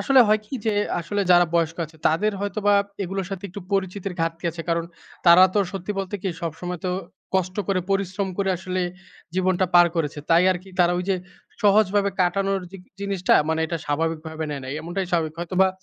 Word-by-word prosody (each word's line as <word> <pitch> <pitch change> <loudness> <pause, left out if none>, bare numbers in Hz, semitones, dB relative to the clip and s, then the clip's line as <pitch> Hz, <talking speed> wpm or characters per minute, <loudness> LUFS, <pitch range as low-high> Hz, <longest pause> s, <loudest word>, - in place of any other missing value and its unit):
আসলে 270 -2 +5
হয় 215 0 +4
কি 265 - -7
যে 215 - +2 0.3
আসলে 200 +5 -2
যারা 175 -1 +7
বয়স্ক 165 -1 +1
আছে 160 +1 -19
তাদের 205 +7 +1
হয়তো 205 0 -3
বা 205 - +6 0.3
এগুলোর 190 0 -3
সাথে 195 0 -6
একটু 195 +3 -8
পরিচিতের 195 -1 -1
ঘাটতি 165 0 -2
আছে, 165 0 -7
কারণ 165 0 +1 0.4
তারা 170 +2 +9
তো - - +3
সত্যি 195 +1 -4
বলতে 195 +1 -3
কি 195 - -1
সবসময় 175 +2 -4
তো 180 - 0 0.4
কষ্ট 185 0 0
করে 190 -2 +2
পরিশ্রম 195 0 0
করে 195 -1 +1
আসলে 185 +1 -3 0.5
জীবনটা 185 0 +2
পার 175 0 +8
করেছে 150 -2 -1
তাই 170 +2 +6
আর 185 - +1
কি 195 - -15
তারা 175 0 +4
ওই 180 - -2
যে 190 - +2 0.5
সহজভাবে 205 -1 +4
কাটানোর 195 +2 +1
জিক 195 -2 -11 0.2
জিনিসটা 195 -2 +1
মানে 160 0 +1
এটা 165 +1 -2
স্বাভাবিকভাবে 160 +1 -2
নেয় 140 -2 -4
নাই। 130 - -5
এমনটাই 175 +3 -3
স্বাভাবিক 160 -2 0
হয়তো 175 +2 -4
বা 190 - +5
185 Hz, 195 wpm, -23 LUFS, 165-195 Hz, 0.5 s, তারা